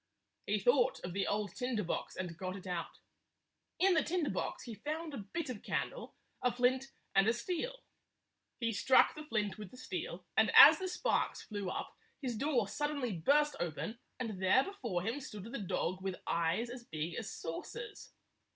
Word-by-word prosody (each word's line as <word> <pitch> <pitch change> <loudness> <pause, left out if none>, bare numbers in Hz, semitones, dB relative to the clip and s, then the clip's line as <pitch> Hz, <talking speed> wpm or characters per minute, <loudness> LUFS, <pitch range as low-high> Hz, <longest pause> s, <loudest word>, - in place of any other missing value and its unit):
He - - +2
thought - - +3
of 180 - -5
the 195 +1 0
old 205 0 -1
tinder 250 -4 -1
box 175 - -3
and 175 -3 -4
got 185 +2 -4
it 195 - -9
out. 175 -2 -4 0.8
In 380 +1 +5
the 315 - +4
tinder 335 -3 0
box - - -3
he 235 - -6
found 305 - -4
a 270 - -4
bit 285 +11 -4
of 245 -5 -5
candle, - - -3 0.3
a 250 - +3
flint, 255 +2 +1 0.2
and 195 +2 +5
a 225 - +5
steel. 370 - -3 0.8
He 230 -2 +1
struck 220 +6 +5
the 305 - -8
flint 215 -8 -1
with 210 -3 -7
the 255 - -14
steel, - - -5
and - - +5
as - - +11
the 375 - -2
sparks - - 0
flew 205 -3 -4
up, - - -4 0.3
his 255 -5 -2
door 245 -3 +1
sud 295 +9 -1
denly 245 - -3
burst 295 - +4
open, 175 +7 -3 0.2
and 220 -7 -4
there 190 +8 +5
before 235 - -3
him 230 +7 -1
stood 210 -7 -8
the 230 +5 -5
dog 185 -1 -1
with 190 -1 -2
eyes 170 +8 0
as 245 -1 -8
big 160 -4 -4
as - - -4
saucers. 465 - -6
235 Hz, 190 wpm, -34 LUFS, 195-295 Hz, 0.8 s, as